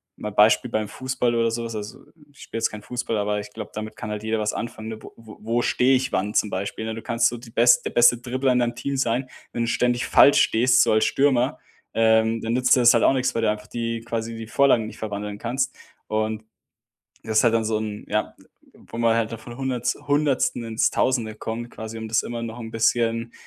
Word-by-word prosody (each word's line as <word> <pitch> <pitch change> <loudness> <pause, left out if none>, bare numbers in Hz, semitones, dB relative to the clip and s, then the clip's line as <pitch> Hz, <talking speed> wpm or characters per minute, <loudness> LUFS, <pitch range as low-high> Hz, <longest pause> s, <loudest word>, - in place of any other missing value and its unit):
mal 105 - -6
Beispiel 105 +4 +4
beim 110 -2 -1
Fußball 130 0 -1
oder 115 0 +2
so 115 +1 -3
was 115 -1 -6
also, 105 +5 -7 0.3
ich 135 - -23
spiele 115 - -6
jetzt 115 - +1
kein 105 -1 -8
Fußball, 120 0 -3
aber 105 0 -1
ich 105 0 -8
glaube, 110 -2 -8
damit 110 0 -6
kann 110 - -6
halt 105 0 -5
jeder 110 0 -1
was 105 0 -1
anfangen, 110 -1 -6
ne, 110 -1 -7
wo - - -12
wo 110 -2 -13
wo 115 +2 -1
stehe 130 +2 +3
ich 130 0 -1
wann 100 +3 -1
zum 105 - +1
Beispiel, 100 +3 -4
ne? 110 - -3
Du 115 - -7
kannst 115 +1 +1
so 120 - -6
die 115 -1 -13
bes 120 +2 +5
der - - -2
beste 120 0 +5
Dribbler 130 +2 -1
in 125 - +2
deinem 120 -1 0
Team 140 0 -3
sein, 130 0 0 0.2
wenn 120 - -1
du - - -2
ständig 120 0 +1
falsch 145 - +6
stehst, 125 +2 +4
so - - +3
als 110 - +3
Stürmer, 135 -1 +1 0.3
ähm, 110 0 +3
dann 115 +1 -2
nützt 125 +1 +4
dir - - +2
das 120 0 +7
halt 115 - +2
auch - - +5
nix, 130 -1 0
weil 115 - 0
du 105 - +3
einfach 105 0 -7
die 115 -1 -3
quasi 115 0 -4
die 115 0 -7
Vorlagen 120 -3 +3
nicht - - -10
verwandeln 105 -1 -5
kannst. 130 +3 -2 0.3
Und 110 0 -2 0.8
das 110 -1 0
ist - - +4
halt 115 -1 +4
dann 115 -1 +1
so 110 0 0
'n 105 -1 -5
ja, - - -1 0.4
wo - - -12
man 115 -1 +3
halt 115 -1 0
da 115 - -4
von 120 +2 -11
Hunderts 125 -2 -2
100. 145 -4 +1
ins 115 0 +1
1000. 115 -4 0
kommt, 115 +2 -5
quasi, 110 +1 -8
um 110 - -6
das 110 0 +2
immer 120 -1 -5
noch 115 0 -6
'n 115 -2 -7
bisschen, 115 0 +1
115 Hz, 245 wpm, -23 LUFS, 110-120 Hz, 0.8 s, das